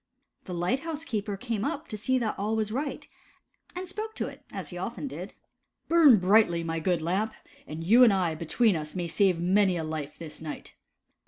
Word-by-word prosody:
The 180 - -6
light 175 +10 0
house 325 +1 -5
keeper 210 -5 -3
came 225 -1 -3
up 305 +3 -3
to - - -4
see 255 +5 +1
that 230 -4 0
all 210 +2 0
was 215 -1 -1
right, 280 +5 -3 0.7
and 365 +1 -5
spoke 435 +4 -5
to - - -2
it - - -9
as - - -6
he 175 - -7
often 235 +9 -4
did. - - -7 0.3
" - - -52
Burn 315 -8 +7
brightly, 185 -3 +4
my 165 0 -2
good 170 -1 0
Lamp, 195 +6 -1 0.3
and 155 +2 -6
you 230 +9 +6
and 235 - +7
I 185 -4 +1
between 175 +7 +2
us 150 +1 -4
may 175 -2 -2
save 185 0 +2
many 185 +1 +3
a 165 - -2
life 155 -2 -5
this 160 -2 -8
night." 155 -2 -7
200 Hz, 210 wpm, -28 LUFS, 170-245 Hz, 0.7 s, Burn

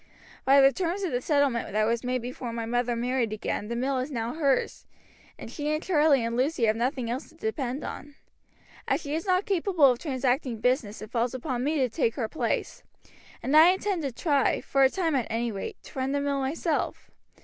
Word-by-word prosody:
By 275 +1 +6
the 270 0 +6
terms 375 +2 -2
of 360 - -1
the 245 0 -1
settlement 280 -7 +1
that 215 0 +2
was 230 +2 0
made 250 -1 -1
before 245 -1 -5
my 230 -1 -4
mother 245 +1 0
married 240 -1 0
again 210 -1 -3
the 235 - -3
mill 260 +2 0
is 255 +3 -3
now 235 -3 -3
hers, 280 -5 0 0.5
and - - -9
she 295 -1 -3
and 305 +1 -1
Charlie 300 -8 +3
and 230 0 -2
Lucy 260 +1 0
have 215 0 +2
nothing 250 +1 -1
else 245 +5 -4
to - - -20
depend 295 - -3
upon. 290 0 -7 0.7
As - - +1
she 285 -1 -5
is 330 +6 -3
not 370 +1 +2
capable 360 - +3
of 245 - -3
transacting 260 -4 -1
business 230 -3 0
it 215 - -10
falls 240 +1 0
upon 255 -1 -3
me 300 +4 0
to 260 -3 +2
take 230 0 -1
her 230 -5 -2
place, 265 - -2 0.6
and 275 - +1
I 330 +4 +8
intend 380 -2 -2
to 275 -3 -2
try, 280 +2 +1
for 275 - 0
a 265 - +7
time 335 0 -1
at 260 -4 0
any 230 +1 -1
rate, 195 -2 -6
to - - -8
run 265 +1 -1
the 285 - +1
mill 280 -1 -1
myself. 295 +4 -2
265 Hz, 215 wpm, -27 LUFS, 240-300 Hz, 0.7 s, I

